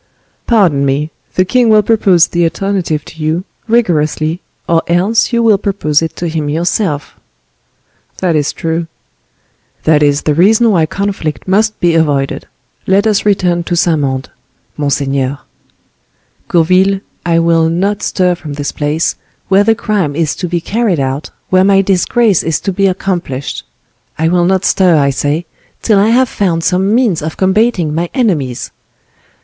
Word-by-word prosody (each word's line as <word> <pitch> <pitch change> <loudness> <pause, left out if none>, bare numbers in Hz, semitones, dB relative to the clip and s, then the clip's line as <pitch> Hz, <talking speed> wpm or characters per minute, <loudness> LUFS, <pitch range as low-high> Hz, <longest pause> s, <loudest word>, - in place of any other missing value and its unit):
"Pardon 180 - +3
me;—the 150 +6 -2
king 245 +4 +2
will 215 -1 +5
propose 195 -6 +3
the 175 0 -2
alternative 170 -3 -2
to 160 - -12
you, 160 +4 -1 0.2
rigorously, 165 -7 0 0.3
or 165 -1 +2
else 190 +8 +1
you 235 -1 +1
will 215 -3 +4
propose 165 -8 0
it 165 - -4
to 175 - -4
him 155 -2 -3
yourself." 160 -1 -2 1.0
"That 175 -3 0
is 145 -1 0
true." 165 0 -3 1.0
"That 155 -1 +3
is 145 -1 +2
the 150 - +1
reason 215 +8 +4
why 165 -5 +2
conflict 195 -5 -4
must 215 +3 +1
be 175 -1 +2
avoided. 145 -4 0 0.4
Let 195 +3 +3
us 210 -1 +1
return 180 -4 +1
to 175 - -1
Saint 170 -2 +2
Mande, 135 -2 -3 0.4
monseigneur." 140 -2 -1 1.1
"Gourville, 185 +3 +2 0.2
I 170 -1 +1
will 165 -1 +2
not 195 +5 -1
stir 180 -1 +1
from 155 -4 -8
this 145 0 -4
place, 150 +2 -1 0.3
where 195 +1 +4
the 225 +2 +3
crime 195 -10 -1
is 160 -2 -1
to 180 - -3
be 175 0 -1
carried 210 -3 -1
out, 135 +2 -3 0.2
where 185 0 +4
my 195 0 +4
disgrace 195 +2 +2
is 160 -1 -1
to 195 - -2
be 195 +2 +2
accomplished; 175 -8 -3 0.5
I 160 +1 +1
will 175 0 +2
not 190 +1 +1
stir, 180 -4 +3
I 140 -1 +2
say, 145 +5 -2 0.4
till 215 -3 +3
I 205 +3 +3
have 255 +3 +3
found 175 -7 -1
some 190 +5 +1
means 220 -10 +1
of 155 +1 -5
combating 190 -4 +1
my 170 +2 -2
enemies." 155 - -1
175 Hz, 155 wpm, -13 LUFS, 155-195 Hz, 1.1 s, will